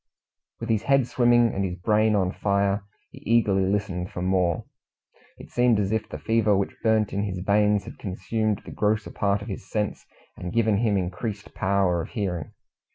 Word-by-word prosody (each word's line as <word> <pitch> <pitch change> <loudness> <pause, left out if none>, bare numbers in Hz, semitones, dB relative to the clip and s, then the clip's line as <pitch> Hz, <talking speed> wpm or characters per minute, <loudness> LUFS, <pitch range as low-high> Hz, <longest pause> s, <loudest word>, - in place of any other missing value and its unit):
With - - -5
his 110 -2 +2
head 135 -2 +3
swimming, 120 -1 +3
and 100 - -1
his 90 -2 -2
brain 105 +4 +2
on 95 -2 +1
fire, 100 0 0 0.3
he - - -12
eagerly 100 -4 +2
listened 95 -3 -2
for 90 - -5
more. 90 -3 +1 0.7
It - - -13
seemed 120 -3 +3
as 100 -1 0
if 110 -1 -1
the - - -6
fever 110 -3 +2
which 100 - -2
burnt 110 -2 +2
in 100 - 0
his 100 -3 -3
veins 105 +2 +2
had - - -11
consumed 105 +3 -2
the - - -8
grosser 105 0 0
part 100 0 0
of - - -9
his 95 -2 -7
sense, 105 -1 -2 0.3
and 90 - -6
given 110 -2 +2
him 105 -2 +2
increased 100 +3 -4
power 95 -3 +1
of - - -7
hearing. 90 - -3
100 Hz, 185 wpm, -25 LUFS, 95-110 Hz, 0.7 s, head